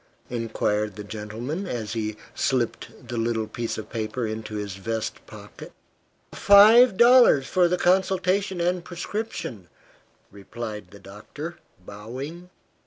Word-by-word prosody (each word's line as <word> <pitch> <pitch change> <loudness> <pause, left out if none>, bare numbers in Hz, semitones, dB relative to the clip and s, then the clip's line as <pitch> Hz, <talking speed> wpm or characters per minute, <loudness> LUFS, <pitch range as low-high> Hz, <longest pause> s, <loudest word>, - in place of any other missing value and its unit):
inquired 105 -3 -1
the 105 - -7
gentleman, 110 - -5
as 115 - -4
he 110 -2 -3 0.2
slipped 125 -3 -2
the 120 - -5
little 115 -1 0
piece 115 +1 -4
of 110 -1 -8
paper 115 +1 -3
into 110 0 -5
his 105 -2 -4
vest 110 +2 -4
pocket. - - -12 0.6
"Five 210 +2 +7
dollars 235 - +6
for 180 +3 +3
the 180 +1 0
consultation 190 +1 +1
and 175 +1 0
prescription," 175 - -5 0.6
replied 105 0 -8
the 100 - -14
doctor, 105 - -9 0.3
bowing. 130 - -8
120 Hz, 120 wpm, -25 LUFS, 105-180 Hz, 0.6 s, Five